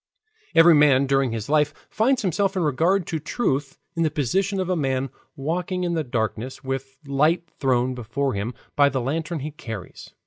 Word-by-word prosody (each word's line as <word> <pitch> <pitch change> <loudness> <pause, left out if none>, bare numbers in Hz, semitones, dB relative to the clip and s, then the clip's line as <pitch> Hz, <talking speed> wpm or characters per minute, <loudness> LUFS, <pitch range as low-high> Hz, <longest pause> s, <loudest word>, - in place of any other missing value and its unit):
Every 165 +1 +8
man 145 -3 +5
during 135 -2 +2
his 110 -2 -4
life 150 0 +2 0.2
finds 250 +3 +2
himself 195 +2 +1
in 180 - +1
regard 165 +6 +2
to 160 - -3
truth 145 - -2 0.2
in 165 - -1
the 160 - +3
position 190 - 0
of 185 - -1
a 185 - +1
man 135 -4 -1 0.2
walking 175 +5 -2
in 175 -1 0
the 160 -2 0
darkness 120 +2 -3
with 135 0 -4
light 150 +5 +2
thrown 130 -2 +2
before 125 +3 -2
him 105 +4 -3 0.2
by 145 -1 +5
the 135 - -1
lantern 155 +5 -2
he 150 +3 -4
carries. 115 - -8
145 Hz, 180 wpm, -24 LUFS, 130-170 Hz, 0.2 s, Every